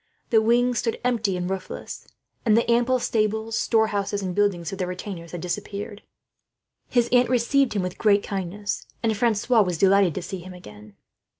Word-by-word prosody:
The 220 -2 +5
wings 240 +2 +2
stood 230 - -2
empty 220 -6 0
and 180 0 -3
roofless, 190 0 -6 0.4
and 220 -2 +4
the 235 - +2
ample 245 +2 +3
stables, 220 -1 -1
storehouses, 205 -3 0
and 185 -1 -3
buildings 185 -4 0
for - - -4
the 185 -2 -3
retainers 180 -2 -7
had 175 - -6
disappeared. 200 +3 -5 0.9
His 240 -2 +2
aunt 245 -1 +4
received 255 +2 +2
him 200 -3 -1
with 180 0 -5
great 205 -2 +3
kindness, 200 +1 -4 0.2
and 225 -1 +1
Francois 230 +1 +2
was 180 -4 0
delighted 195 -2 +4
to 185 - -4
see 190 +2 -6
him 180 +1 -10
again. 105 - -13
205 Hz, 175 wpm, -24 LUFS, 185-230 Hz, 0.9 s, The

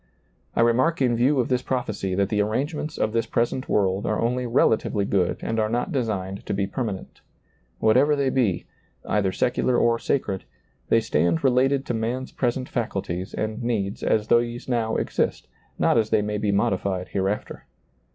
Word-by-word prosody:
I - - +3
remark 125 +8 +3
in 125 -3 +2
view 130 +4 +3
of 125 - +1
this 125 -1 +1
prophecy 110 -8 -2
that 100 +1 +1
the 105 -1 +1
arrangements 145 +8 -2
of 110 - 0
this 115 -1 0
present 120 +2 -1
world 95 -1 +1
are 110 - 0
only 125 +2 0
rela 115 -1 +4
tively 100 -2 -2
good 90 -3 +1
and 115 0 -1
are 110 0 +1
not 120 - -1
designed 100 - -2
to - - -1
be 100 0 0
per 130 +6 -3
manent. 100 -5 -6 0.6
Whatever 130 +7 +4
they 140 -2 +1
be, 115 -10 +1 0.2
— - - -33
either 100 -3 +1
secular 125 +5 +1
or 115 -1 +3
sacred, 100 -9 -1 0.2
— - - -40
they 115 - +4
stand 85 -6 +1
related 135 +1 +3
to - - -2
man's 120 +4 -2
present 125 0 -1
faculties 95 -5 -3
and 110 +2 -3
needs 105 -5 -2
as 110 0 +1
these 120 +1 +1
now 115 -3 0
exist, - - -1 0.3
not - - +3
as 110 -1 0
they 110 -2 +2
may 105 0 -2
be 105 -1 +1
modified 95 -2 0
hereafter. 100 +2 -3
115 Hz, 185 wpm, -24 LUFS, 100-125 Hz, 0.6 s, rela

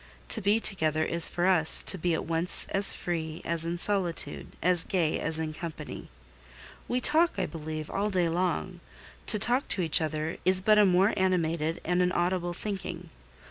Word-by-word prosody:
To - - -2
be 205 +3 +1
together 155 -7 -1
is 170 -1 +4
for 175 - -3
us 175 -4 +7
to - - +4
be 175 -1 -2
at - - -6
once 165 +2 +5
as 195 0 +5
free 160 -2 -5
as 165 -1 0
in 170 +1 -4
solitude, 185 -2 -1
as 180 -1 0
gay 170 -5 -2
as 155 +1 -3
in 160 -1 -5
company. 165 -1 -9 0.8
We 245 - -2
talk, 315 +2 +2
I 190 - -2
believe, 155 -1 -8
all 205 +2 -3
day 180 -4 -1
long: 180 +1 -4 0.5
to 210 - +5
talk 245 +6 0
to 185 - -1
each 160 -1 +1
other 155 +1 -5
is 185 +1 +2
but 210 +3 +2
a 205 - +4
more 185 +3 +1
animated 165 -4 -2
and 180 +1 -1
an 180 0 0
audible 175 0 -3
thinking. 200 -1 -8
175 Hz, 180 wpm, -26 LUFS, 160-190 Hz, 0.8 s, us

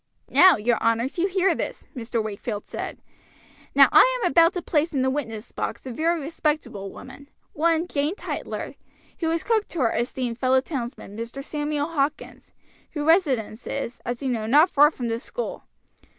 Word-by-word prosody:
"Now, 370 -3 +7
your 230 +2 0
honors, 230 +7 0
you 365 - +3
hear 385 0 +2
this," - - -5
Mr. 230 -2 -2
Wakefield 210 0 -5
said. - - -6 0.8
"Now - - +8
I - - +6
am 360 -7 +1
about 335 0 +6
to 360 - -3
place 315 +1 0
in 265 -2 +1
the 260 - +2
witness 230 -5 -5
box 235 - -4
a 260 - -5
very 330 +7 0
respectable 300 -9 -2
woman, 265 +2 -12 0.2
one 330 +2 +1
Jane 295 +2 -1
Tytler, - - -5 0.5
who 325 - 0
is 330 0 -1
cook 440 -2 +1
to 340 - -6
our 230 - +2
esteemed 240 0 -2
fellow 260 0 +3
townsman, 245 -7 -6
Mr. 230 +5 -6
Samuel 295 0 -2
Hawkins, 295 -3 -3 0.4
whose 295 -2 -3
residence 270 - +1
is, 265 -3 -4
as 245 +2 -4
you 265 - 0
know, 225 -3 -2
not 300 +9 +5
far 295 +1 +6
from 250 -6 -5
this 230 +1 -3
school. - - -5
280 Hz, 180 wpm, -24 LUFS, 235-330 Hz, 0.8 s, Now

